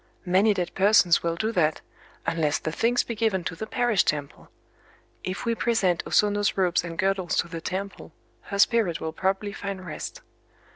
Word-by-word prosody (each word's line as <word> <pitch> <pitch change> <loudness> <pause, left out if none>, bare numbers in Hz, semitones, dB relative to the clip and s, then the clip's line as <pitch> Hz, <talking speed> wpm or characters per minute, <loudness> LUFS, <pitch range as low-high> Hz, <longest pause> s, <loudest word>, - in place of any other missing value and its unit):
Many 195 +4 +3
dead 180 -2 -3
persons 195 -4 +4
will 170 0 -1
do 220 +6 -1
that,—unless 160 -3 -2
the 155 - -4
things 235 +8 +1
be 235 - -5
given 215 -5 0
to 165 - -4
the 220 +6 -6
parish 240 -3 +2
temple. 145 -2 -3 0.7
If 185 +5 -4
we 230 - +1
present 225 -7 +1
O - - -7
Sono's 205 -1 +2
robes 180 -2 +2
and 165 -1 -7
girdles 190 -2 0
to 180 - +1
the 165 -1 -7
temple, 195 +3 -5 0.4
her 200 - -3
spirit 205 -5 +3
will 160 0 -4
probably 195 +2 -1
find 195 -2 -6
rest." 160 - -7
190 Hz, 175 wpm, -25 LUFS, 170-210 Hz, 0.7 s, persons